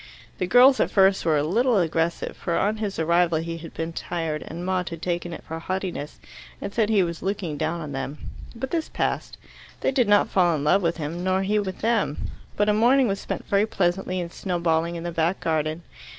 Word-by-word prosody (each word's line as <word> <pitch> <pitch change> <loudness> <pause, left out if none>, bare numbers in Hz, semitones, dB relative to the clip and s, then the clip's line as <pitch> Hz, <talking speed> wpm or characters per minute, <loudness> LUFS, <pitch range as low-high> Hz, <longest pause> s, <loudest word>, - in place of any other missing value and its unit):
The 185 - 0
girls 255 +6 +6
at - - +2
first 195 -2 +3
were 160 -2 +3
a 145 - +1
little 230 - +2
aggressive, 165 -1 0
for 170 - -2
on 210 +2 +1
his 210 -3 -3
arrival 170 +1 +2
he 165 +1 -4
had 165 0 -9
been 165 +1 -3
tired, 165 -3 -3
and 170 +2 -6
Maud 180 -2 -1
had 165 -1 -7
taken 175 0 -2
it 165 - -8
for 160 0 -6
haughtiness, 180 -4 -4 0.4
and 200 - -5
said 220 -2 +1
he 205 -4 +4
was 170 -1 -4
looking 190 -5 -2
down 160 +3 -2
on 150 -2 -6
them. 135 +2 -4 0.4
But 260 +3 -5
this 330 -2 -1
passed. - - -2 0.4
They - - +2
did 255 -4 +2
not 205 0 +5
fall 175 -3 +3
in 145 - -3
love 185 +7 +4
with 170 -1 0
him, 165 +3 -4
nor 185 +1 +1
he 210 +2 +1
with 190 -2 -4
them, 220 -9 0 0.3
but 205 - +2
a 210 - +4
morning 245 +4 +4
was 195 -1 -1
spent - - -5
very 200 +2 +2
pleasantly 185 -2 0
in 170 -1 -4
snow 180 -1 -3
balling 170 0 +1
in 165 - -5
the 175 - -3
back 165 +3 0
garden. 155 +1 -1
175 Hz, 220 wpm, -24 LUFS, 165-200 Hz, 0.4 s, girls